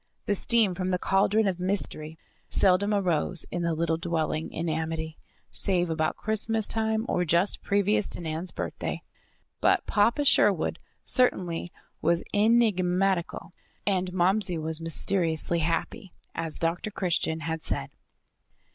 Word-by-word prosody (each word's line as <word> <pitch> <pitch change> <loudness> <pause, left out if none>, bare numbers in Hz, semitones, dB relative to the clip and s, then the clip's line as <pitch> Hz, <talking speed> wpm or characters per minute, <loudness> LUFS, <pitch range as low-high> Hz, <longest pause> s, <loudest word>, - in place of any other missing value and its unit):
The 205 - +1
steam 215 -1 +2
from 185 +1 -3
the 180 - +1
cauldron 200 +3 +2
of 185 -2 -1
Mystery 170 -4 -3 0.3
seldom 195 +2 +3
arose 180 -4 +1
in 175 - -2
the 170 -1 0
little 165 0 0
"dwelling 160 -2 -2
in 165 +1 -4
amity" 160 0 -3 0.3
save 175 -3 +1
about 160 -1 -1
Christmas 220 0 0
time 220 0 0
or 180 - 0
just 175 +4 +1
previous 205 +1 +1
to - - -7
Nan's 165 +1 -4
birthday. - - -5 0.6
But - - +2
Papa 235 +8 +2
Sherwood 200 - +3 0.2
certainly 180 -9 +1 0.3
was 170 +1 +1
enigmatical 195 -6 +1 0.3
and 185 -2 0
Momsey 185 0 +2
was 160 0 -2
mysteriously 165 0 0
happy, 165 +3 -2 0.2
as 165 -2 -4
Dr. 170 +5 -1
Christian 170 -5 -1
had 160 0 -3
said. 70 - -4
180 Hz, 130 wpm, -27 LUFS, 165-200 Hz, 0.6 s, seldom